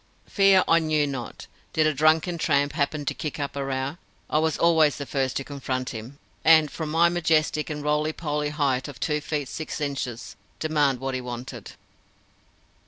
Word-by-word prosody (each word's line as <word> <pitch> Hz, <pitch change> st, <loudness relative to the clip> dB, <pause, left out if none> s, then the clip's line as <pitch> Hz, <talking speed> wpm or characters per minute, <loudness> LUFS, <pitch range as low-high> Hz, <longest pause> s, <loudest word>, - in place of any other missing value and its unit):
Fear 195 Hz, -2 st, +4 dB
I 165 Hz, -, +5 dB
knew 155 Hz, -2 st, +1 dB
not. 135 Hz, -4 st, -6 dB, 0.3 s
Did 155 Hz, -, +3 dB
a 155 Hz, -, +3 dB
drunken 155 Hz, +4 st, +2 dB
tramp 145 Hz, -2 st, +1 dB
happen 145 Hz, 0 st, -1 dB
to -, -, -1 dB
kick 150 Hz, -1 st, -5 dB
up 140 Hz, -2 st, -3 dB
a 140 Hz, -, -2 dB
row, 135 Hz, +3 st, -3 dB, 0.3 s
I 155 Hz, -, +3 dB
was 160 Hz, -1 st, +1 dB
always 160 Hz, -3 st, +4 dB
the 140 Hz, -, -5 dB
first 135 Hz, -2 st, -1 dB
to 140 Hz, -, -3 dB
confront 130 Hz, -2 st, -4 dB
him, 120 Hz, +4 st, -8 dB, 0.3 s
and, 160 Hz, -2 st, +6 dB
from 160 Hz, -2 st, -4 dB
my 165 Hz, +2 st, +4 dB
majestic 160 Hz, -3 st, +1 dB
and 150 Hz, -1 st, -4 dB
roly 150 Hz, +1 st, +1 dB
poly 150 Hz, -2 st, -2 dB
height 140 Hz, -3 st, 0 dB
of 140 Hz, -5 st, -10 dB
two 150 Hz, -1 st, 0 dB
feet 145 Hz, -2 st, -3 dB
six 155 Hz, +3 st, -5 dB
inches, 135 Hz, -5 st, -4 dB, 0.2 s
demand 145 Hz, -5 st, +1 dB
what 135 Hz, 0 st, -2 dB
he 130 Hz, -, -2 dB
wanted. 125 Hz, 0 st, -7 dB
150 Hz, 180 wpm, -25 LUFS, 135-155 Hz, 0.3 s, and